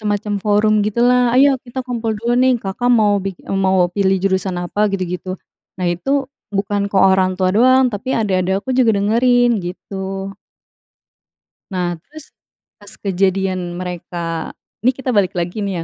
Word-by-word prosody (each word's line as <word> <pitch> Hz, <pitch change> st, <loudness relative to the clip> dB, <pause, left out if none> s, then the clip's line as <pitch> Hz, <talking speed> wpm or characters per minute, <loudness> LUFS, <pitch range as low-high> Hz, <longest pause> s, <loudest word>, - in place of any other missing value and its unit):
semacam 205 Hz, 0 st, -2 dB
forum 210 Hz, +1 st, +3 dB
gitulah. 245 Hz, +2 st, +2 dB
“Ayo 275 Hz, +2 st, +6 dB, 0.2 s
kita 255 Hz, +2 st, -5 dB
kumpul 230 Hz, -2 st, -2 dB
dulu 235 Hz, +2 st, -1 dB
nih, 260 Hz, 0 st, +4 dB
Kakak 245 Hz, +6 st, -1 dB
mau 210 Hz, -3 st, +4 dB
bik 195 Hz, -2 st, -4 dB
eee, 195 Hz, -, -1 dB
mau 185 Hz, -2 st, +3 dB
pilih 195 Hz, -1 st, +2 dB
jurusan 190 Hz, -1 st, 0 dB
apa,” 205 Hz, +4 st, -4 dB
gitu-gitu. 185 Hz, -1 st, -4 dB, 0.5 s
Nah, 180 Hz, -, 0 dB
itu 175 Hz, +10 st, -5 dB, 0.5 s
bukan 200 Hz, 0 st, -1 dB
ke -, -, 0 dB
orang 190 Hz, -1 st, +4 dB
tua 185 Hz, -1 st, +1 dB
doang, 255 Hz, +2 st, +5 dB
tapi 210 Hz, +6 st, -6 dB
adik-adik 190 Hz, -3 st, 0 dB
aku 260 Hz, -, -6 dB
juga 245 Hz, -3 st, +4 dB
dengerin, 240 Hz, +3 st, +3 dB
gitu. 195 Hz, +1 st, -6 dB, 1.4 s
Nah, 175 Hz, -2 st, -2 dB
terus, 305 Hz, -, -13 dB, 0.6 s
pas 205 Hz, -, -12 dB
kejadian 190 Hz, -2 st, 0 dB
mereka 175 Hz, -2 st, -5 dB, 0.4 s
nih 255 Hz, -, +4 dB
kita 265 Hz, -1 st, -3 dB
balik 195 Hz, -3 st, +2 dB
lagi 175 Hz, +5 st, -3 dB
nih 200 Hz, -1 st, -2 dB
200 Hz, 150 wpm, -18 LUFS, 185-235 Hz, 1.4 s, Ayo